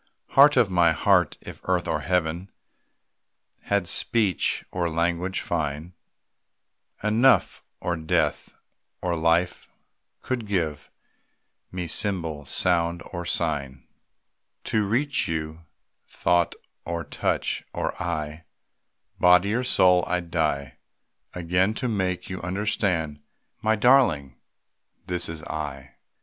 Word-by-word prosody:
Heart 140 Hz, +1 st, +6 dB
of 120 Hz, -4 st, +5 dB
my 85 Hz, -2 st, +4 dB
heart! -, -, +2 dB
if -, -, -10 dB
earth -, -, 0 dB
or -, -, 0 dB
Heaven 90 Hz, +1 st, -1 dB, 1.2 s
Had 100 Hz, -3 st, 0 dB
speech 105 Hz, -5 st, 0 dB
or 85 Hz, -2 st, -1 dB
language 85 Hz, +3 st, -1 dB
fine 75 Hz, +5 st, -3 dB, 1.1 s
Enough, 115 Hz, +5 st, +3 dB, 0.2 s
or 90 Hz, -, -1 dB
death 80 Hz, -1 st, -1 dB, 0.5 s
or 90 Hz, -1 st, 0 dB
life 85 Hz, +2 st, +1 dB, 0.5 s
could 120 Hz, -4 st, -3 dB
give 80 Hz, -7 st, -2 dB, 0.8 s
Me 90 Hz, -1 st, -4 dB
symbol, 80 Hz, -5 st, -1 dB
sound, 85 Hz, +1 st, 0 dB
or 85 Hz, -1 st, -4 dB
sign 70 Hz, -3 st, -2 dB, 0.8 s
To 105 Hz, -2 st, 0 dB
reach 135 Hz, +4 st, +1 dB
you 80 Hz, 0 st, -4 dB, 0.4 s
thought, 85 Hz, -1 st, +1 dB, 0.3 s
or 85 Hz, -1 st, -3 dB
touch, -, -, -2 dB
or -, -, -2 dB
eye, 80 Hz, -2 st, -4 dB, 0.7 s
Body 90 Hz, +3 st, +5 dB
or 125 Hz, +3 st, 0 dB
soul 90 Hz, -7 st, +4 dB
I 90 Hz, -, +1 dB
'd 85 Hz, -1 st, -11 dB
die 70 Hz, -6 st, -1 dB, 0.6 s
Again, 90 Hz, +4 st, +1 dB
to 125 Hz, -, -2 dB
make 95 Hz, -5 st, -1 dB
you 95 Hz, -, -6 dB
understand: 90 Hz, -5 st, -1 dB, 0.4 s
My 110 Hz, +1 st, +2 dB
darling! 105 Hz, -, +3 dB, 0.7 s
This 90 Hz, -2 st, -1 dB
is 80 Hz, -2 st, -7 dB
_I! 70 Hz, -3 st, -6 dB
90 Hz, 110 wpm, -25 LUFS, 80-100 Hz, 1.2 s, Heart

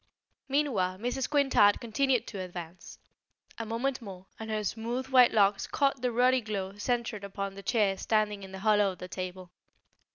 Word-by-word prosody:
Meanwhile 235 Hz, -11 st, +1 dB
Mrs. 245 Hz, +4 st, -2 dB
Quintard 270 Hz, -8 st, +4 dB
continued 250 Hz, +2 st, +1 dB
to 200 Hz, -, -7 dB
advance. 175 Hz, -1 st, -8 dB, 0.6 s
A 225 Hz, -, -4 dB
moment 245 Hz, +4 st, -2 dB
more, 190 Hz, -4 st, -9 dB
and 220 Hz, 0 st, -6 dB
her 215 Hz, -1 st, -1 dB
smooth 235 Hz, +5 st, -3 dB
white 255 Hz, -2 st, +6 dB
locks 200 Hz, -2 st, +3 dB
caught 275 Hz, -2 st, 0 dB
the 250 Hz, -1 st, 0 dB
ruddy 250 Hz, +2 st, +3 dB
glow 200 Hz, -3 st, -4 dB
centred 235 Hz, -2 st, -2 dB
upon 200 Hz, 0 st, -4 dB
the 200 Hz, -, -9 dB
chair 205 Hz, -3 st, +1 dB
standing 210 Hz, -2 st, 0 dB
in 190 Hz, -1 st, -10 dB
the 190 Hz, -, -7 dB
hollow 210 Hz, -2 st, +4 dB
of -, -, -15 dB
the 180 Hz, -, -8 dB
table. 185 Hz, 0 st, -6 dB
215 Hz, 170 wpm, -29 LUFS, 195-245 Hz, 0.6 s, white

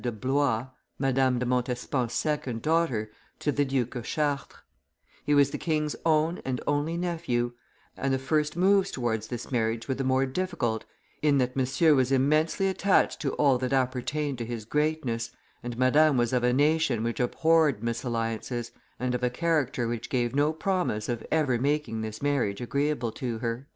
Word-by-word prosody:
de 120 Hz, -, -1 dB
Blois, 130 Hz, +1 st, 0 dB, 0.3 s
Madame 135 Hz, -1 st, +2 dB
de 125 Hz, -, -1 dB
Montespan's 125 Hz, 0 st, -1 dB
second 135 Hz, -7 st, -2 dB
daughter, 150 Hz, -10 st, +1 dB, 0.3 s
to 145 Hz, -, 0 dB
the 145 Hz, -, +1 dB
Duke 130 Hz, -3 st, -1 dB
of 125 Hz, -3 st, -5 dB
Chartres; 140 Hz, -, -2 dB, 0.6 s
he 145 Hz, -, +2 dB
was 140 Hz, -1 st, +4 dB
the -, -, -4 dB
king's 150 Hz, -2 st, -1 dB
own 160 Hz, +2 st, +2 dB
and 130 Hz, -2 st, -2 dB
only 145 Hz, +3 st, 0 dB
nephew, 160 Hz, -9 st, -1 dB, 0.4 s
and 135 Hz, -, -1 dB
the 135 Hz, -, +2 dB
first 150 Hz, +4 st, 0 dB
moves 195 Hz, +1 st, +4 dB
towards 110 Hz, -4 st, -2 dB
this 120 Hz, +1 st, -6 dB
marriage 115 Hz, -1 st, -1 dB
were 130 Hz, -, 0 dB
the 135 Hz, -, -3 dB
more 130 Hz, +1 st, +2 dB
difficult 130 Hz, -7 st, -2 dB, 0.4 s
in 145 Hz, -2 st, +3 dB
that 125 Hz, -1 st, 0 dB
Monsieur 135 Hz, +5 st, +3 dB
was 130 Hz, -2 st, +2 dB
immensely 155 Hz, +8 st, +2 dB
attached 190 Hz, 0 st, +2 dB
to 140 Hz, -, -1 dB
all 140 Hz, -4 st, +3 dB
that 130 Hz, +1 st, -1 dB
appertained 135 Hz, +2 st, -1 dB
to 115 Hz, -, -3 dB
his 115 Hz, -3 st, -5 dB
greatness, 150 Hz, -4 st, -1 dB, 0.3 s
and 120 Hz, -1 st, -6 dB
Madame 140 Hz, +3 st, +4 dB
was 120 Hz, 0 st, +1 dB
of 125 Hz, -1 st, +2 dB
a 125 Hz, -, +3 dB
nation 145 Hz, -3 st, +2 dB
which 115 Hz, 0 st, -2 dB
abhorred 150 Hz, -1 st, +2 dB
misalliances, 115 Hz, 0 st, -2 dB, 0.3 s
and 125 Hz, 0 st, -1 dB
of 125 Hz, -, -1 dB
a 125 Hz, -, +2 dB
character 135 Hz, -4 st, 0 dB
which 115 Hz, -1 st, -4 dB
gave 120 Hz, -2 st, 0 dB
no 145 Hz, +2 st, +3 dB
promise 160 Hz, -, -1 dB
of 120 Hz, -2 st, -2 dB
ever 145 Hz, -7 st, +2 dB
making 140 Hz, -4 st, 0 dB
this 110 Hz, +2 st, -6 dB
marriage 130 Hz, -9 st, 0 dB
agreeable 140 Hz, -1 st, -1 dB
to 120 Hz, 0 st, -4 dB
her." 115 Hz, +4 st, -4 dB
130 Hz, 175 wpm, -27 LUFS, 120-150 Hz, 0.6 s, was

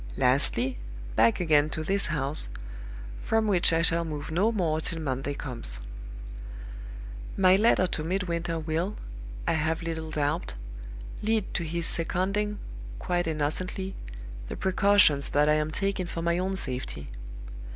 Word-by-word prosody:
Lastly, 130 Hz, -1 st, +2 dB, 0.4 s
back 115 Hz, -, +4 dB
again 155 Hz, -4 st, +3 dB
to 155 Hz, 0 st, -4 dB
this 195 Hz, +4 st, +2 dB
house 145 Hz, -, +2 dB, 0.7 s
from 225 Hz, 0 st, +1 dB
which 190 Hz, -6 st, +4 dB
I 165 Hz, 0 st, +2 dB
shall 170 Hz, +1 st, +4 dB
move 155 Hz, -2 st, -5 dB
no 195 Hz, +8 st, +2 dB
more 165 Hz, -7 st, 0 dB
till 165 Hz, 0 st, -1 dB
Monday 140 Hz, -1 st, -3 dB
comes. 115 Hz, -, 0 dB, 1.6 s
"My 185 Hz, -1 st, +6 dB
letter 210 Hz, -2 st, +4 dB
to 160 Hz, -3 st, -2 dB
Midwinter 170 Hz, -1 st, -2 dB
will, 165 Hz, +5 st, -2 dB, 0.5 s
I -, -, +3 dB
have 160 Hz, +1 st, -1 dB
little 160 Hz, -1 st, -4 dB
doubt, 150 Hz, -, -2 dB, 0.7 s
lead 215 Hz, -1 st, 0 dB
to 175 Hz, -, -1 dB
his 170 Hz, +1 st, -3 dB
seconding 195 Hz, +6 st, 0 dB, 0.4 s
(quite 175 Hz, -, -1 dB
innocently) 165 Hz, +5 st, -2 dB, 0.6 s
the -, -, -5 dB
precautions 190 Hz, -7 st, +4 dB
that 145 Hz, +1 st, +2 dB
I 150 Hz, -, +4 dB
am 155 Hz, 0 st, 0 dB
taking 195 Hz, +2 st, -1 dB
for 165 Hz, -1 st, -5 dB
my 170 Hz, +1 st, +1 dB
own 190 Hz, +1 st, -1 dB
safety. 125 Hz, -, -3 dB
165 Hz, 140 wpm, -27 LUFS, 150-185 Hz, 1.6 s, My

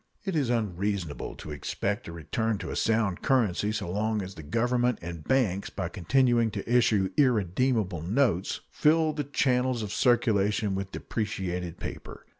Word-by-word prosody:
It 190 Hz, -3 st, -2 dB
is 140 Hz, -6 st, +1 dB
unreasonable 100 Hz, -7 st, -2 dB
to 75 Hz, -, -9 dB
expect 100 Hz, +8 st, -3 dB
a -, -, -6 dB
return 105 Hz, +7 st, -2 dB
to -, -, -6 dB
a -, -, -4 dB
sound 110 Hz, -5 st, +1 dB
currency 105 Hz, -6 st, +2 dB
so 110 Hz, -, -3 dB
long 105 Hz, +1 st, 0 dB
as 95 Hz, +1 st, -7 dB
the 80 Hz, -, -9 dB
Government 120 Hz, +8 st, +1 dB
and 85 Hz, -2 st, -7 dB
banks, 100 Hz, -, +1 dB
by 90 Hz, -3 st, -4 dB
continuing 120 Hz, +5 st, +2 dB
to 100 Hz, -1 st, -6 dB
issue 115 Hz, -5 st, +3 dB
irredeemable 110 Hz, -, +2 dB
notes, 100 Hz, -, +1 dB
fill 155 Hz, 0 st, +3 dB
the 145 Hz, -2 st, -3 dB
channels 130 Hz, -3 st, +1 dB
of 105 Hz, -1 st, -4 dB
circulation 105 Hz, -4 st, +2 dB
with 95 Hz, 0 st, -3 dB
depreciated 90 Hz, -5 st, -3 dB
paper. -, -, -8 dB
105 Hz, 155 wpm, -28 LUFS, 95-125 Hz, -, issue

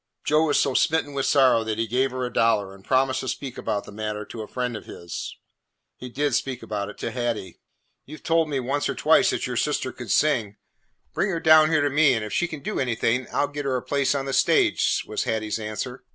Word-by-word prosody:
Joe 155 Hz, +2 st, +3 dB
was 145 Hz, -, +2 dB
so 135 Hz, -, +1 dB
smitten 155 Hz, +1 st, +1 dB
with 135 Hz, -1 st, -1 dB
sorrow 130 Hz, -5 st, +4 dB
that 110 Hz, -1 st, -3 dB
he 115 Hz, -, 0 dB
gave 125 Hz, +4 st, +1 dB
her 130 Hz, 0 st, -3 dB
a 125 Hz, -, -6 dB
dollar 105 Hz, -4 st, +2 dB
and 95 Hz, 0 st, -16 dB
promised 130 Hz, +1 st, +1 dB
to 130 Hz, -, -5 dB
speak 130 Hz, +1 st, -4 dB
about 100 Hz, -1 st, -2 dB
the -, -, -12 dB
matter 105 Hz, 0 st, -4 dB
to 110 Hz, -, -8 dB
a 105 Hz, -, -7 dB
friend 125 Hz, -2 st, -3 dB
of 105 Hz, -, -8 dB
his. 85 Hz, -1 st, -7 dB, 0.6 s
He 125 Hz, -, -9 dB
did 145 Hz, +2 st, -1 dB
speak 125 Hz, 0 st, -2 dB
about 105 Hz, -2 st, -4 dB
it 105 Hz, -, -11 dB
to -, -, -3 dB
Hattie. 120 Hz, -6 st, -3 dB, 0.5 s
"You 155 Hz, +3 st, -9 dB
've -, -, -22 dB
told 165 Hz, -1 st, +2 dB
me 140 Hz, -2 st, -1 dB
once 135 Hz, +3 st, -1 dB
or -, -, -2 dB
twice -, -, +4 dB
that -, -, -1 dB
your -, -, -3 dB
sister -, -, 0 dB
could -, -, -9 dB
sing. 115 Hz, -9 st, +1 dB, 0.6 s
Bring 195 Hz, -, 0 dB
her 170 Hz, -3 st, -1 dB
down 155 Hz, -1 st, +6 dB
here 155 Hz, -2 st, +3 dB
to 145 Hz, -, +2 dB
me, 145 Hz, -2 st, +4 dB
and 110 Hz, -2 st, -2 dB
if 105 Hz, -, -7 dB
she 175 Hz, -, +1 dB
can 155 Hz, -4 st, -8 dB
do 210 Hz, +6 st, -3 dB
anything, 125 Hz, 0 st, 0 dB
I -, -, +1 dB
'll 145 Hz, -, -1 dB
get 145 Hz, 0 st, -5 dB
her 135 Hz, -2 st, 0 dB
a 125 Hz, -, -5 dB
place 140 Hz, 0 st, 0 dB
on 135 Hz, -1 st, -2 dB
the 135 Hz, -, -3 dB
stage," -, -, +2 dB
was -, -, -3 dB
Hattie's 110 Hz, 0 st, -2 dB
answer. 110 Hz, +4 st, -5 dB
130 Hz, 250 wpm, -24 LUFS, 110-145 Hz, 0.6 s, down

